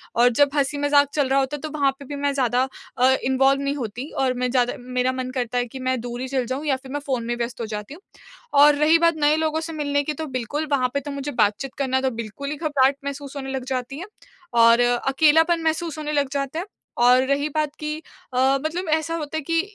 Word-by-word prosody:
और 240 +1 +5
जब 285 +4 +3
हँसी-मज़ाक 285 0 +3
चल 285 -3 +1
रहा 275 0 +3
होता 270 +2 -1
है - - -14
तो 310 - -4
वहाँ 275 -1 +3
पे 280 - -10
भी 285 - -6
मैं 280 0 0
ज़्यादा 255 -1 +1 0.3
अ, 255 +1 +5
इन्वॉल्व 270 +1 +3
नहीं 280 +1 -1
होती 245 +1 -5
और 255 -1 +2
मैं 250 - +1
ज़्यादा 245 -2 +2
मेरा 250 +1 -1
मन 255 0 -4
करता 245 -1 -2
है 245 - +1
कि 260 +3 -9
मैं 255 -1 +1
दूर 240 +1 -6
ही 260 - -3
चली 260 -2 -1
जाऊँ 265 +5 -4
या 280 - +2
फिर 265 0 -11
मैं 290 - -2
फ़ोन 255 -4 -1
में 240 +1 -1
व्यस्त 235 0 -4
हो - - -2
जाती 210 +4 -6
हूँ। 355 - -13 0.6
और 295 0 +7
रही 305 +3 +4
बात 335 -1 +3
नए 295 +1 +4
लोगों 315 0 0
से 325 0 -6
मिलने 285 -1 0
की 300 - -2
तो 315 +2 -5
बिल्कुल 290 +6 -3
वहाँ 255 -3 +2
पे 280 - +1
तो 285 +1 -7
मुझे 280 +1 -4
बातचीत 235 +5 0
करना 260 -1 0
तो 265 - +1
बिल्कुल 255 +6 -7
ही 300 - -3
घबराहट 280 -3 +2
महसूस 280 0 -6
होने 270 -1 -5
लग 265 -1 -3
जाती 260 +1 -3
है 365 - -6 0.6
और 230 +1 +6
अकेलापन 305 +7 +3
महसूस 320 -1 -1
होने 300 -1 -4
लग 285 -2 +1
जाता 280 +3 -2
है। 365 - -4 0.4
और 250 +1 +6
रही 280 +1 +1
बात 305 -1 -1
कि 305 0 -3 0.4
अ, - - -2 0.3
मतलब 340 +2 -2
ऐसा 320 +1 0
होता 315 -1 -4
है - - -2
कि 330 +3 +1
275 Hz, 245 wpm, -23 LUFS, 255-295 Hz, 0.6 s, और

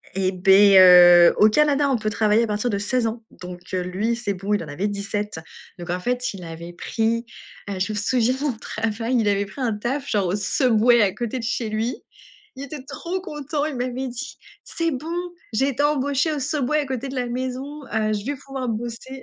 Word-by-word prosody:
Et 190 -1 +1
beh, 195 +2 +6
heu, 175 -1 +8
au 215 - +6
Canada, 290 +3 +2
on 265 - +2
peut 215 -1 -2
travailler 215 +1 +2
à - - -1
partir 210 +3 -1
de 205 - -1
16 235 +4 0
ans. 225 +1 -3
Donc, 180 0 -10
heu, 185 - 0
lui, 200 +6 -1
c'est 230 -4 -3
bon, 195 +2 -3
il 205 - 0
en - - -10
avait 155 +8 -3
17. 205 -2 -4 0.4
Donc 175 0 -9
en 180 - -1
fait, 245 +5 -2
il 190 -2 -9
avait 170 +1 -8
pris, 225 +6 -1 0.4
heu, 195 -2 -4
je 200 +4 -1
me 210 - -4
souviens 245 +3 +1
au - - +1
travail, 225 +3 -2
il 215 - +1
avait 200 0 +1
pris 200 +8 -10
un 235 -3 0
taf, 265 +7 -3
genre 200 -3 +1
au 180 - 0
Subway 235 +2 +3
à 195 -3 +2
côté 235 +3 -4
de 245 - -5
chez 230 -1 -2
lui. 220 +3 -3 0.5
Il 265 - -7
était 280 -1 -8
trop 360 +6 -5
content, 295 -4 -4
il 305 -3 -4
m'avait 255 +1 -3
dit: 285 +4 -7 0.3
«C'est 330 -1 -2
bon, 310 +5 -4 0.4
j'ai 265 +6 +2
été 275 +2 -1
embauché 285 +1 +1
au 295 - -3
Subway 290 +1 0
à 295 - -1
côté 260 0 -4
de 265 - -7
la 250 -1 -2
maison, 260 +4 -5
heu, 215 -1 +1
je 205 0 -4
vais 285 +2 -2
pouvoir 270 -1 -6
bosser». 240 +4 -6
230 Hz, 220 wpm, -22 LUFS, 205-265 Hz, 0.5 s, heu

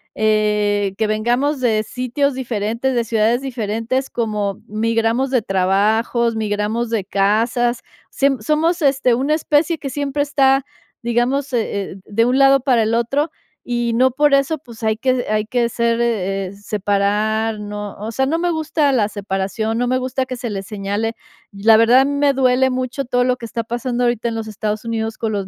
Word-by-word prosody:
eh, 210 -2 +1
que 220 -1 +1
vengamos 240 +7 0
de 220 -4 +1
sitios 255 +4 -1
diferentes, 240 +1 -2
de 235 - +2
ciudades 230 +2 +1
diferentes, 240 0 -2
como 210 -4 -2
migramos 225 +4 0
de 250 - +2
trabajos, 215 +5 +1
migramos 215 +2 -1
de 225 -3 -1
casas, 230 +5 +1 0.3
siem 275 -2 +1
somos, 320 - +1
este, 270 -3 +3
una 275 +5 0
especie 310 +1 +1
que 280 -2 -5
siempre 285 +1 -1
está, 275 -1 +2 0.4
digamos, 245 +4 0
eh 205 -4 -2
eh, - - -9
de 230 +2 +1
un 250 +2 +2
lado 275 -1 +5
para 245 -4 +3
el 220 +1 0
otro, 275 +7 0 0.4
y 240 -1 0
no 255 +2 +3
por 290 +2 +2
eso, 275 +3 +2
pues, 235 -5 -14
hay 220 -1 +1
que 255 0 0
hay 215 0 0
que 240 +1 0
ser, 235 0 0
eh 195 -5 -1
eh, 185 - -9
separar 210 +2 -1
no 205 -1 -6
o 220 +2 -5
sea, 265 +4 0
no 320 +5 0
me 350 0 0
gusta 310 -3 +1
la 215 -5 +2
separación, 205 +2 -2
no 245 +1 0
me 255 +1 +1
gusta 260 +1 -2
que 255 0 -5
se 240 -1 -4
le 195 -2 -4
señale. 205 +3 -3 0.4
La 215 +2 +4
verdad, 230 +3 +6
a 270 - +4
mí 285 - -1
me 285 -1 +2
duele 260 0 +3
mucho 255 +2 -2
todo 245 0 +1
lo 250 0 +2
que 235 - -8
está 230 0 -4
pasando 240 +1 -2
ahorita 240 -1 0
en 225 - -4
los 220 -1 -4
Estados 215 +1 -3
Unidos 225 -1 -3
con 225 -1 -1
los 195 -2 -2
235 Hz, 190 wpm, -19 LUFS, 215-260 Hz, 0.4 s, verdad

